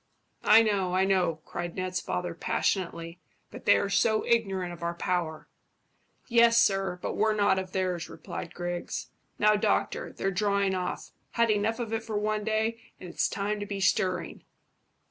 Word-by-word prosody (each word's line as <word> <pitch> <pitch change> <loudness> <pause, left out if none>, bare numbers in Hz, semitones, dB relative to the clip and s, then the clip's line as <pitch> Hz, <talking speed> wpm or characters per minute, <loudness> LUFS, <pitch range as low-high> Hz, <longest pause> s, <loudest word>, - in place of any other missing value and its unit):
"I 225 - +7
know, 195 -4 0
I 190 +1 +3
know," 180 -5 +1
cried 175 -1 -5
Ned's 185 -1 -2
father 180 -1 -3
passionately; 170 0 -2 0.3
"but - - -10
they - - +6
are 200 - 0
so 215 +2 +2
ignorant 195 -6 0
of 175 - -12
our 170 0 -2
power." 170 -3 -2 0.8
"Yes, 235 -1 +5
sir, 195 -4 +2
but - - -2
we're 215 0 +2
not 200 -2 +3
of 185 -1 -6
theirs," 185 -3 -2
replied 170 - -7
Griggs. 175 0 -4 0.3
"Now, 210 0 +4
doctor, 205 - 0
they're 195 - -2
drawing 200 0 +1
off. 180 -1 -4 0.2
Had 235 -1 +3
enough 215 +2 +1
of 230 -2 -4
it 225 - 0
for 220 -1 -4
one 210 0 -1
day, 220 +1 -1 0.2
and 180 - -9
it's - - 0
time 205 +1 -2
to 205 - -5
be 200 -1 -4
stirring." 185 -3 0
195 Hz, 170 wpm, -28 LUFS, 180-215 Hz, 0.8 s, I